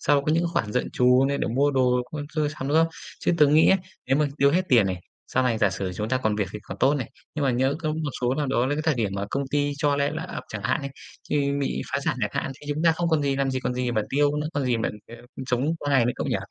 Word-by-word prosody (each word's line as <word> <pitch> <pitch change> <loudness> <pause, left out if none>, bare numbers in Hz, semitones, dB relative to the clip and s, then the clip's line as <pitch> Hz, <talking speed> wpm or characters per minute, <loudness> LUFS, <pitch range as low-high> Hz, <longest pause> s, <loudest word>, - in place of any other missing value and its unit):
sau 145 0 +3
có 150 - +1
những 165 +2 +2
khoản 105 -9 -1
dự 125 - +1
trù 125 +1 +4
như 140 - 0
để - - -1
mua 140 +5 +2
đồ 125 -2 +2
con 150 -1 -4
sơ 155 -2 -1
sắm, 140 -3 -5
đúng 150 - +2
không? 165 0 +4 0.3
Chứ - - +1
tớ 150 - +7
nghĩ 155 +3 +5
á, 190 - +6 0.3
nếu 135 - +2
mà 150 0 +2
tiêu 140 0 +5
hết 180 +5 +2
tiền 115 -6 +5
này, 95 -1 -1 0.3
sau 130 - +1
này 120 -3 +1
giả 105 -3 +3
sử 95 0 -3
chúng 105 +4 -3
ta 130 - +1
còn 110 -2 +1
việc 100 -3 -1
thì 105 - -5
còn 95 - -8
tốt 135 +2 +4
này. 130 -5 -3 0.2
Nhưng 150 - -1
mà 135 - +3
nhỡ 130 +3 +1
có 160 - -3
một 155 -2 -2
số 125 +1 +1
nào 150 0 -1
đó 130 -2 +1
là 145 - 0
cái 155 - -2
thời 160 -1 +2
điểm 110 -5 -1
mà 100 0 -2
công 140 - -1
ty 145 0 +1
cho 145 -1 +1
le 140 0 +1
layoff - - -5
chẳng - - -6
hạn - - +1
đi, 140 - -3 0.4
như 140 -1 +1
bị 140 - -1
phá 140 - +1
sản - - 0
chẳng 105 - 0
hạn 135 - -4
thì 145 - -13
chúng 155 - -3
ta 165 -1 +5
không 170 +1 -1
còn 160 -3 +2
gì, 140 -1 0
làm 135 -1 0
gì 130 0 -2
còn 125 - -2
gì 125 -1 -1
mà 110 - +1
tiêu 145 +1 +2
nữa, 150 0 -1
còn 145 -1 0
gì 125 -2 +1
mà, 115 - -1 0.2
kiểu, 115 - -11 0.3
sống 130 +6 0
qua 145 - -3
ngày 130 -4 +4
nữa 120 - +1
cậu - - -3
nhỉ. - - +1
140 Hz, 315 wpm, -25 LUFS, 125-145 Hz, 0.4 s, tớ